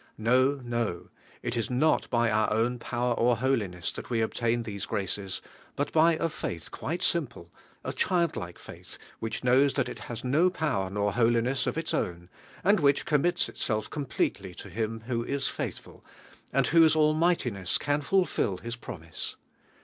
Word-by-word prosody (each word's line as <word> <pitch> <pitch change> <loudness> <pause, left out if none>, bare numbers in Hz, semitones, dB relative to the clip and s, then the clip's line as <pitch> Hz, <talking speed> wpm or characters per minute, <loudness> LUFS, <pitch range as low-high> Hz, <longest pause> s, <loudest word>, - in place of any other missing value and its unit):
No, 130 +5 +3
no; 115 -7 -2 0.3
it 120 0 -2
is 115 -2 -1
not 140 +6 +2
by 120 -1 +2
onr 110 0 +2
own 120 +3 +1
power 120 +1 -1
or 120 0 +3
holiness 105 -9 0
that - - -8
we 115 -2 +1
ob 110 - -2
tain 115 0 0
these 100 -3 -5
graces, 95 -1 -2 0.3
but 145 - -1
by 165 +1 +5
a 160 - 0
faith 85 - -5
quiie 170 +2 -3
simple, 125 - -1 0.3
a - - -3
childlike 170 - 0
faith, - - -10 0.2
which 115 +3 -4
knows 130 +3 +4
that 135 - +1
it - - -7
has 120 -1 -5
no 150 +8 +4
power 145 - -1
nor 100 0 0
holiness 120 +3 +2
of - - -1
its 165 -1 -2
own, 85 0 -2 0.3
and 200 +3 +5
which 140 -2 +3
commits 170 +4 +2
itself 110 -2 -2
complete 140 -8 -1
ly 95 -2 -8
to 100 - -10
Him 110 +3 -2
who 115 0 -2
is 140 +2 -1
faithful, - - -6 0.5
and - - +3
whose 160 -1 +5
al 155 -1 +4
mightiness 130 - +1
can 145 0 0
fulfil 155 - +1
IBs 115 0 -4
.promise. 85 0 -6
120 Hz, 170 wpm, -28 LUFS, 110-145 Hz, 0.5 s, by